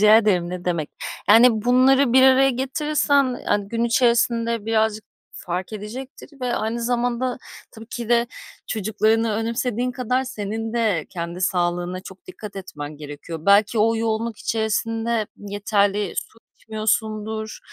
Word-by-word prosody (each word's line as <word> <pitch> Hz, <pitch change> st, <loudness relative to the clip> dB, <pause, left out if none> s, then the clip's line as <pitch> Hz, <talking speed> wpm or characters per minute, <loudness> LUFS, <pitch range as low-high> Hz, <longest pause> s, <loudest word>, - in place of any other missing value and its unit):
Rica 215 Hz, +1 st, +7 dB
ederim, 190 Hz, -6 st, +2 dB
ne 180 Hz, 0 st, -6 dB
demek. 170 Hz, -4 st, -1 dB, 0.4 s
Yani 225 Hz, 0 st, +6 dB
bunları 255 Hz, +1 st, +4 dB
bir 260 Hz, 0 st, +6 dB
araya 265 Hz, +1 st, +6 dB
getirirsen, 275 Hz, 0 st, +1 dB
hani, 205 Hz, -1 st, 0 dB
gün 230 Hz, +1 st, -1 dB
içerisinde 235 Hz, -2 st, +2 dB
birazcık 220 Hz, -1 st, +1 dB, 0.3 s
fark 180 Hz, +4 st, -5 dB
edecektir 255 Hz, +6 st, -9 dB
ve 250 Hz, -1 st, -1 dB
aynı 230 Hz, +2 st, -2 dB
zamanda 245 Hz, +1 st, -1 dB, 0.3 s
tabii 225 Hz, 0 st, -12 dB
ki 235 Hz, -1 st, -6 dB
de, 235 Hz, 0 st, +3 dB, 0.4 s
çocuklarını 220 Hz, +1 st, +1 dB
önemsediğin 240 Hz, +2 st, -1 dB
kadar 255 Hz, +1 st, -1 dB
senin 225 Hz, -1 st, -4 dB
de 215 Hz, -9 st, 0 dB
kendi 170 Hz, 0 st, -5 dB
sağlığına 175 Hz, 0 st, -1 dB
çok 190 Hz, -, -13 dB
dikkat 210 Hz, -, -9 dB
etmen 150 Hz, -6 st, -7 dB
gerekiyor. 150 Hz, +2 st, -8 dB
Belki 205 Hz, +3 st, +4 dB
o 225 Hz, +1 st, +3 dB
yoğunluk 225 Hz, 0 st, -2 dB
içerisinde 225 Hz, 0 st, -1 dB
yeterli 205 Hz, -1 st, 0 dB
su 225 Hz, -, -5 dB, 0.2 s
içmiyorsundur 220 Hz, 0 st, -2 dB
220 Hz, 130 wpm, -22 LUFS, 205-240 Hz, 0.4 s, Rica